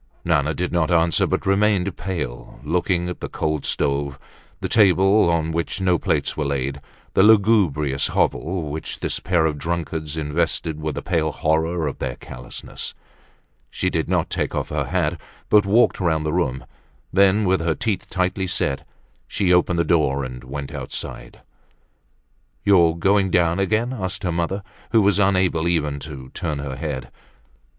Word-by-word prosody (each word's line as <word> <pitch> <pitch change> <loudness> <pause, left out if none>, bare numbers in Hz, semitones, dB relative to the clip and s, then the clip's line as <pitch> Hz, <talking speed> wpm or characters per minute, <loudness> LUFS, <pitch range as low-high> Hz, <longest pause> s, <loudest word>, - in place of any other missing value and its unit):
Nana 80 -2 +1
did 90 0 -2
not 85 -2 +1
answer, 85 -1 +3
but - - -1
remained 100 -1 +2
pale, 75 -11 -5
looking 90 +3 0
at 90 - -5
the - - -5
cold 75 -2 -2
stove, 70 0 -1 0.4
the - - -2
table 95 -2 +4
on 80 -1 +1
which 85 +4 -2
no 90 -3 +2
plates - - 0
were 75 - -1
laid, 70 0 -2 0.3
the - - +4
lugubrious 95 -10 +4
hovel 80 -3 -1
which 80 +2 -5
this - - -1
pair 85 -3 +1
of 75 -2 -1
drunkards 80 -2 -3
invested 80 +1 -1
with 75 -1 -3
the - - -5
pale 80 -3 0
horror 80 +2 0
of 70 - -5
their - - -3
callousness. 60 -1 -8 0.7
She - - -1
did - - -1
not - - 0
take - - -1
off - - -2
her - - -1
hat 85 -2 -1 0.3
but 105 -1 +5
walked 115 +5 +4
round 80 -4 +1
the 75 - -1
room; 65 -8 -1 0.5
then 100 +2 +4
with 95 0 +2
her 80 -1 0
teeth 105 -5 -2
tightly 95 +1 -1
set, 70 -4 -2 0.4
she 90 -3 +1
opened 90 0 +3
the 85 - +3
door 75 -4 +2
and 65 -1 -7
went 70 +1 -6
out. - - -4 1.7
"You 100 -3 +6
are 80 - 0
doing 95 +2 +2
down 85 0 +2
again?" 110 +6 +1
asked 95 -5 -4
her 90 - 0
mother, 85 +4 -2 0.3
who 110 -2 +5
was 100 0 +3
unable 95 -4 +2
even 75 -4 0
to 70 -3 -8
turn 75 0 -3
her 70 -2 -5
head. 75 -3 -5
85 Hz, 165 wpm, -22 LUFS, 75-95 Hz, 1.7 s, You